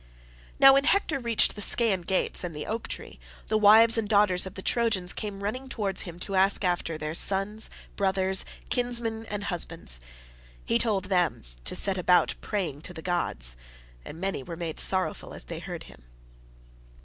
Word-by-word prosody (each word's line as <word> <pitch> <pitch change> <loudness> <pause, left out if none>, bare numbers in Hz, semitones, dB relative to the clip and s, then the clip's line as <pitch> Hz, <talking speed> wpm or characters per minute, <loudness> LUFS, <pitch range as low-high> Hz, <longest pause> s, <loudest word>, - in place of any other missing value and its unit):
Now 270 0 +9
when 275 +1 +3
Hector 320 -5 +1
reached 235 -3 +2
the 205 - -8
Scaean 205 -3 +4
gates 185 +2 0
and 170 -3 -5
the 150 - -5
oak 225 +1 -4
tree, - - -8 0.3
the 215 - +2
wives 225 +2 +6
and 210 -2 -4
daughters 200 -4 +3
of 190 - -11
the 190 - -8
Trojans 220 -7 0
came 200 -2 -6
running 255 +6 -4
towards 205 -6 -2
him 175 -3 -8
to 200 - -5
ask 195 +1 +3
after 175 -2 -1
their 155 0 -5
sons, 195 +5 +1 0.3
brothers, 190 -1 +1 0.3
kinsmen, 235 -2 -1
and 205 0 -4
husbands: 110 - -2 0.6
he 230 - +1
told 210 -5 0
them 180 -4 0 0.2
to - - -4
set 190 -2 +3
about 180 -1 +3
praying 175 -9 -3
to 175 +2 -7
the 160 - -9
gods, - - +1 0.5
and 160 - -10
many 190 -5 -3
were 165 +5 -8
made 165 -2 -5
sorrowful 185 -1 0
as - - -6
they - - -7
heard - - -7
him. - - -16
195 Hz, 175 wpm, -27 LUFS, 175-220 Hz, 0.6 s, Now